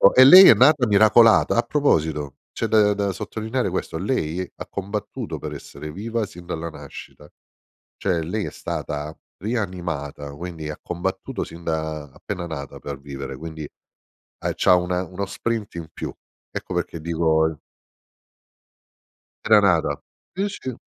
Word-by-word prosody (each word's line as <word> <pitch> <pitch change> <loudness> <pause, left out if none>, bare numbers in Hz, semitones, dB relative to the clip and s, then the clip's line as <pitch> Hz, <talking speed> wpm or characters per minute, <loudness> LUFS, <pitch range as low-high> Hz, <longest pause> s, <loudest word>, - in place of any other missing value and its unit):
e 130 - +9
lei 185 +7 +11
è - - +11
nata 130 0 +5
miracolata, 110 +2 +6
a 120 - +4
proposito, 80 - 0
c'è - - -3
da 105 -2 +4
da 100 -1 -1
sottolineare 110 +4 -3
questo, 90 -2 -3
lei 90 -3 -1
ha - - -8
combattuto 100 +2 -5
per - - -6
essere 75 - -8
viva 115 +3 -2
sin 90 -3 -12
dalla 85 -1 -4
nascita. 75 0 -11 0.7
Cioè 90 -4 0
lei 105 +5 -2
è - - -4
stata 75 +1 -5 0.2
rianimata, 85 - -4
quindi 80 -1 -6
ha 75 - -5
combattuto 90 +2 -3
sin 85 +1 -11
da 80 -3 -3
appena 95 -4 -6
nata 70 -3 -7
per 70 -2 -6
vivere, 70 -1 -7
quindi, 80 +1 -7
eh, - - -16 0.6
c'ha 90 - +5
una 90 0 0
uno 95 +2 -4
sprint 110 +2 -3
in 85 -2 -6
più. - - -6 0.4
Ecco - - -5
perché 85 - -2
dico 80 -1 +1 1.9
Era 110 -1 +7
nata. 90 -5 +2 0.3
Sì, 195 +3 -1
sì. 130 -10 -6
90 Hz, 145 wpm, -23 LUFS, 80-105 Hz, 1.9 s, lei